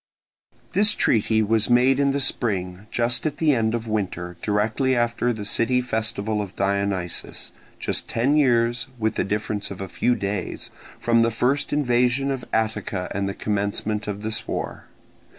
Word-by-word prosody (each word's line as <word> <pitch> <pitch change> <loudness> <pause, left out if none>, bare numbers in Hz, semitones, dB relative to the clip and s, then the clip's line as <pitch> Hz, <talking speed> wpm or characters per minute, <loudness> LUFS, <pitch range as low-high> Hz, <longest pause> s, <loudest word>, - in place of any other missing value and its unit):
This 210 +1 +4
treaty 110 0 +2
was 110 +1 +1
made 125 +2 +4
in 140 -1 +3
the 140 +1 0
spring, 100 -7 -1
just 120 +5 +1
at 150 - -4
the 155 -3 +3
end 115 -2 +1
of 115 -1 -4
winter, 90 -5 -2
directly 110 +6 +1
after 120 0 +1
the 110 -3 -5
city 120 +4 +2
festival 110 -3 -1
of 100 -2 -7
Dionysus, 100 -3 -1 0.3
just - - -2
ten 130 +6 +2
years, 120 -3 +3
with 110 -1 0
the - - 0
difference 105 0 -2
of 100 - -7
a 95 - -4
few 120 +7 +1
days, 100 -3 -4 0.3
from 115 -1 +3
the 115 - +4
first 125 +5 0
invasion 125 -1 +2
of 130 -2 -3
Attica 105 -4 -1
and 100 0 -1
the 100 - -5
commencement 105 +1 -2
of 105 0 -4
this 110 -1 -3
war. - - -4
110 Hz, 165 wpm, -24 LUFS, 105-125 Hz, 0.3 s, This